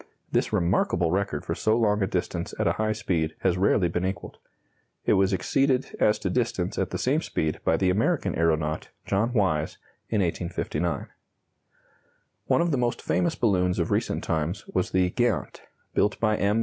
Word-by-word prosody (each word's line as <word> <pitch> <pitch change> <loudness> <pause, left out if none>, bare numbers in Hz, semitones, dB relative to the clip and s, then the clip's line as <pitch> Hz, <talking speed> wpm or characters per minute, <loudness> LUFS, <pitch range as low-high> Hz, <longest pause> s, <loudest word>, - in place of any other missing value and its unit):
This - - +1
remarkable 85 -1 +1
record 100 +1 -1
for - - -1
so 110 +1 +1
long 105 -2 +2
a 95 - +2
distance 90 -2 -3
at - - 0
a - - +4
high 110 0 +1
speed 85 -7 -1
has 90 -2 +2
rarely 95 0 +3
been 90 +1 -2
equalled. 95 +1 -4 0.7
It - - +4
was 95 +1 +3
exceeded 130 +8 +1
as 105 0 +4
to 95 - -2
distance 110 -5 -1
at 95 -2 0
the - - -3
same 145 +5 +1
speed 80 - -2
by 80 - +2
the 95 0 +2
American 110 - +1
aeronaut, 80 -1 0 0.2
John 105 +5 +1
Wise, 95 -10 0 0.3
in 110 -3 +1
1859. 85 -1 -2 1.4
One - - +3
of 170 0 +1
the 140 - +1
most 120 -1 0
famous 170 -2 0
balloons 90 -5 +1
of - - -1
recent - - 0
times 85 +4 -2
was 90 - 0
the 90 -1 +2
"Geant," 120 0 -1 0.3
built 105 - +1
by 110 -2 +2
M. 105 +2 +1
95 Hz, 175 wpm, -26 LUFS, 85-110 Hz, 1.4 s, a